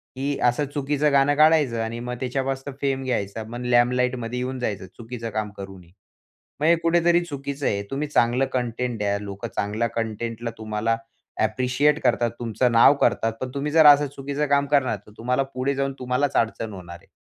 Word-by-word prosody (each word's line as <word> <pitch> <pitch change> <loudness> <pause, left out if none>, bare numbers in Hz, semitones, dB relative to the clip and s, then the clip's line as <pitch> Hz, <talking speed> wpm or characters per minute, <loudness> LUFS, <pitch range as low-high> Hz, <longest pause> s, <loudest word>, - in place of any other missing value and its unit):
की 140 +2 -2
असं 125 +4 +2
चुकीचं 145 +1 0
गाणं 140 +1 +4
काढायचं 150 -6 +4
आणि 115 +1 -4
मग 125 +1 -4
त्याच्यापासनं 135 +2 -3
फेम 135 -1 0
घ्यायचा. 110 -4 -2
मग 120 +3 -7
लाइमलाइटमध्ये 125 0 +1
येऊन 130 +1 -3
जायचं 105 -6 -3
चुकीचं 115 0 -6
काम 110 0 -3
करूनही. 95 -3 -10 0.7
मग 150 - 0
हे 170 - +6
कुठेतरी 170 +1 +3
चुकीचं 140 -2 -5
आहे. 100 -1 0
तुम्ही 145 +2 -2
चांगलं 125 -2 +2
कंटेंट 125 -1 -2
द्या, 100 -1 0
लोकं 100 -1 -6
चांगल्या 105 +3 -1
कंटेंटला 115 +1 -4
तुम्हाला 110 +1 -2 0.5
अ, - - +1
ॲप्रिशिएट 125 +7 +1
करतात. 120 -1 +2
तुमचं 120 +1 0
नाव 115 +4 +7
करतात. 115 0 +2
पण 130 - -3
तुम्ही 145 +2 -2
जर 160 0 +6
असं 145 0 +7
चुकीचं 140 +2 -2
काम 140 0 +3
करणार 140 -4 +2
तर - - -14
तुम्हाला 125 +4 0
पुढे 130 +2 -1
जाऊन 135 0 -1
तुम्हालाच 130 +2 -1
अडचण 115 -1 -1
होणार 85 -2 -9
आहे. - - -25
125 Hz, 180 wpm, -24 LUFS, 115-140 Hz, 0.7 s, नाव